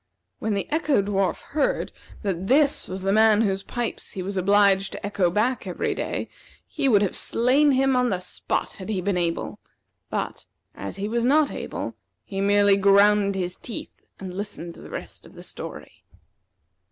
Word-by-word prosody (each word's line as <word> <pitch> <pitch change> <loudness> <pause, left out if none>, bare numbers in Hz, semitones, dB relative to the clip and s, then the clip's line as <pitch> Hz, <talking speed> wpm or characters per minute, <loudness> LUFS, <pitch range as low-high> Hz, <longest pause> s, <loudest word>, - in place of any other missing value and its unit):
When 215 -1 -1
the 200 - -2
Echo 305 -4 +2
dwarf 195 -2 0
heard - - 0 0.3
that 190 -2 -2
this 285 +3 +3
was 185 +1 -5
the 195 - +1
man 220 0 +5
whose 195 -2 0
pipes 240 +3 -4
he 185 - -4
was 195 +2 -4
obliged 195 0 +3
to - - -6
echo 200 -3 +1
back 225 +8 0
every - - -1
day, - - -3 0.4
he 275 - -1
would 210 -4 +5
have 195 - 0
slain 270 +5 +3
him 265 0 +3
on 250 -1 +2
the 185 - 0
spot 180 - -2
had 190 - -7
he 205 -4 0
been 190 +1 0
able; 170 -1 -2 0.5
but, - - -4 0.3
as 100 - -6
he 200 +1 -3
was 235 +2 0
not 290 +4 +4
able, - - -5 0.3
he 195 -2 -4
merely 200 0 +4
ground 200 0 +4
his 180 -1 -2
teeth 235 - -7 0.3
and 185 -2 -7
listened 195 -4 -5
to - - -14
the - - -11
rest - - -8
of - - -18
the - - -10
story. - - -8
205 Hz, 180 wpm, -24 LUFS, 190-235 Hz, 0.5 s, man